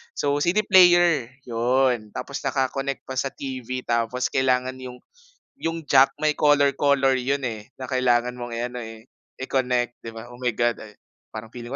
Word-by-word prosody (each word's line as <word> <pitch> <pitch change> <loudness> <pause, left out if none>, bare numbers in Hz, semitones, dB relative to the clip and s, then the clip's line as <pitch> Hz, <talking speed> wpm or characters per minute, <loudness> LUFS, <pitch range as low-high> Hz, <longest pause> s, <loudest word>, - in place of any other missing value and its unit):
So, 145 0 0
CD 185 +7 +2
player 175 - +5 0.2
yun, 120 -2 0
tapos 140 -1 -5
naka-connect 135 0 -2
pa 130 -1 -4
sa 135 - 0
TV 130 -2 -6
tapos 120 +2 -1
kailangan 130 -1 +1
yung 125 -1 -10 0.6
yung 165 -1 -3
jack 135 -1 +5
may 155 0 +2
color 145 -1 +4
color 140 -2 +3
yun, 140 +2 -1
eh, 110 0 -6
na 130 - -6
kailangan 125 -1 +1
mong 120 - -5
i-ano, 125 +1 -4
eh, 110 0 -10 0.3
i-connect 125 -2 -1
'di 115 - -8
ba? 115 - -8
Oh, 120 - -13
my 125 - 0
God, 120 0 +1
ay, 105 -1 -12 0.3
parang 110 +1 -9
feeling 120 -1 -8
130 Hz, 170 wpm, -24 LUFS, 120-140 Hz, 0.6 s, player